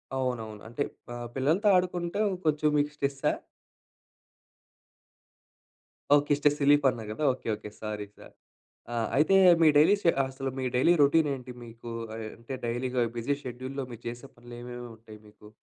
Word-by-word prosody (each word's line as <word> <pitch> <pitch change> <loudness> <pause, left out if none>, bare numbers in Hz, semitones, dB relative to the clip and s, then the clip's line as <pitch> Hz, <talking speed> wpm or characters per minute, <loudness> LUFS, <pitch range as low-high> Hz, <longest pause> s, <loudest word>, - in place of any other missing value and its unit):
అవునవును. 115 -5 -3
అంటే 120 +5 -2 0.3
ఆహ్, 120 0 -6
పిల్లలతో 165 +11 +2
ఆడుకుంటే, 180 +1 -2 0.3
కొంచెం 150 0 +2
మీకు 145 +1 +1
స్ట్రెస్సా? 140 -1 0 2.8
ఓకే. 145 0 +2
స్ట్రెస్ 145 0 +2
రిలీఫన్నా 140 -5 +3
గదా? 130 +8 -4
ఓకే. 125 - -11
ఓకే. 105 0 -9
సారీ 105 -1 -4
సా - - -13 0.7
ఆహ్, 115 -1 -1
అయితే, 155 +7 +4 0.3
మీ 160 - +7
డైలీ 175 +8 +6
షె 170 - +4
అసలు 135 0 -4
మీ - - -2
డైలీ 150 +8 +5
రొటీనేంటి? 140 -4 +2
మీకు 115 0 -10 0.3
ఆయ్, 110 -1 -5
అంటే, 115 +3 -8
డైలీగా 125 +1 -1 0.2
బిజీ 120 +5 0
షెడ్యూల్‌లో, 130 +2 -5
మీరు 120 0 -10
చేసే 120 +3 -7
పనులేమేముంటాయి 120 -2 -10
మీకు? 105 0 -16
130 Hz, 135 wpm, -28 LUFS, 115-145 Hz, 2.8 s, మీ